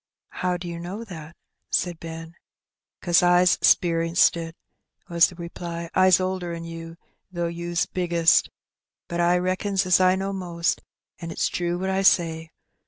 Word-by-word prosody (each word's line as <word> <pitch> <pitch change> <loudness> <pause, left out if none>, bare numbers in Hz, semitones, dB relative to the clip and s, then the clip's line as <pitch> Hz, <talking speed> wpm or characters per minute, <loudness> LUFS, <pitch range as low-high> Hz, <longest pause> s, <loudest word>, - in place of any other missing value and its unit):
''How 180 -1 -1
do 175 - -7
you 170 -1 -6
know 185 +6 -6
that?" 170 -6 -10 0.3
said 175 -2 -1
Benny. 165 0 -8 0.7
"'Cause 175 -1 +4
I's 180 0 +4
'sperienced 165 0 +3
it," 165 -1 -6 0.5
was 170 -1 +5
the 180 - -12
reply. 170 -1 -7
''I*s 185 -1 +5
older 185 -2 -3
'n 165 - -7
you, 165 0 -9 0.3
though 175 -1 -2
you's 170 0 -2
biggest; 170 -2 +2 0.6
but 170 - -4
I 175 +1 +3
reckons 185 +2 -1
as 185 0 +4
I 185 0 +4
knows 195 +1 -3
most, 170 -3 -2 0.4
an 170 -2 -7
it's 165 - -1
true 175 0 -2
what 190 +1 -2
I 190 0 0
say. 165 -4 +2
175 Hz, 160 wpm, -24 LUFS, 170-185 Hz, 0.7 s, was